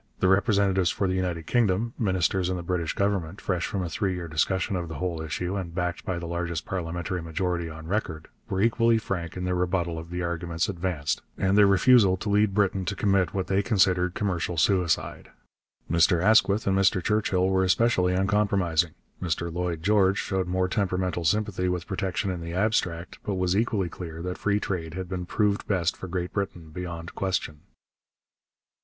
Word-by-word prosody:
The 95 - +3
representatives 95 -2 +3
for 100 - 0
the 90 - 0
United 90 -3 -2
Kingdom, 115 0 +1
ministers 95 -4 +1
in 95 - -1
the 85 - -5
British 85 -2 -1
Government, 100 -3 -1
fresh 90 -3 -1
from 95 -2 -2
a - - -2
three 95 0 -1
year 90 -1 -5
discussion 95 +5 0
of 85 -2 -3
the 80 - -7
whole 85 -3 -3
issue 90 +4 -3
and 90 -4 -5
backed 90 -2 -2
by 95 - -2
the 85 - -5
largest 85 -1 -3
parliamentary 90 -1 -3
majority 85 0 -2
on 80 0 -9
record, 85 -4 -3 0.2
were 95 0 0
equally 115 0 +3
frank 90 -6 -4
in 90 - -3
their 90 0 0
rebuttal 90 -2 -1
of 80 +1 -9
the 90 0 -3
arguments 85 -1 -2
advanced 85 -6 -2 0.2
and 95 +1 +2
their 105 -1 +7
refusal 100 -1 +5
to 105 - -4
lead 105 -1 +3
Britain 100 -2 +1
to 100 - -2
commit 95 -3 +1
what 95 -1 0
they 95 +1 +1
considered 95 -4 +2
commercial 90 -4 -1
suicide. 90 +1 +1 0.6
Mr 85 +1 +3
Asquith 105 +1 +4
and 95 - +2
Mr 95 -2 +3
Churchill 95 -3 +1
were 95 0 +2
especially 90 -2 +2
uncompromising; 95 -4 +1 0.3
Mr 85 -1 -2
Lloyd 85 -2 -2
George 100 -1 +3
showed 95 -2 -1
more 90 +1 +1
temperamental 90 -2 -1
sympathy 100 -1 +1
with 90 -2 -2
protection 95 0 -2
in 90 -2 -5
the 85 +1 -5
abstract, 90 -4 -1
but 100 - -3
was 90 0 +1
equally 105 -3 +1
clear 85 -1 -7
that 90 0 -4
free 105 0 +1
trade 85 -5 -4
had 95 -1 -4
been 90 -1 -4
proved 105 0 0
best 90 -4 +1
for 95 - -8
Great 90 0 -3
Britain 90 -5 -4
beyond 85 0 -6
question. 90 -6 -2
90 Hz, 185 wpm, -26 LUFS, 85-100 Hz, 0.6 s, their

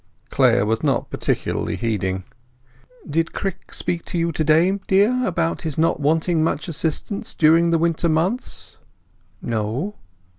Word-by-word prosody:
Clare 100 - +3
was 110 +1 0
not - - 0
particularly - - -2
heeding. 95 -5 -2 0.8
"Did 165 +2 -1
Crick 195 -2 -5
speak 170 -1 -2
to - - -4
you 170 0 +1
to 155 - -1
day, 165 +6 +3
dear, 210 +7 +3
about 170 -5 -1
his 160 -4 -4
not 160 +1 +2
wanting 160 +2 +1
much 160 +1 -1
assistance 165 +5 -3
during 165 +2 +4
the 165 - +3
winter 170 +1 +1
months?" 175 +11 -2 0.7
"No." 115 - -2
165 Hz, 140 wpm, -21 LUFS, 150-175 Hz, 0.8 s, during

